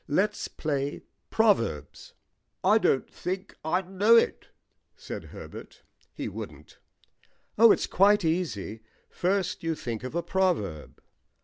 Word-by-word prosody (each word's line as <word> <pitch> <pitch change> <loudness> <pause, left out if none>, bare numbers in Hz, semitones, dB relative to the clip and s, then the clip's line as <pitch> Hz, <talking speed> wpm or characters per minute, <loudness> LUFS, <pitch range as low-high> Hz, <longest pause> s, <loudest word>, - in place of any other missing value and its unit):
"Let's 205 +8 0
play 145 -2 -3 0.3
proverbs." 115 - +1 0.5
"I 210 +4 +5
don't 135 - +2
think 185 +2 -5
I 180 +4 +1
know 195 +5 +4
it," 230 - +2 0.5
said - - -7
Herbert. - - -11 0.3
(He - - -4
wouldn't.) - - -9 0.8
"Oh, 230 -1 +8
it's - - +2
quite 205 0 +4
easy. 140 - -2 0.3
First 185 0 0
you 165 -1 -1
think 120 -6 -5
of 130 +5 -6
a 170 - 0
proverb." 160 - -1
180 Hz, 120 wpm, -27 LUFS, 140-195 Hz, 0.8 s, Oh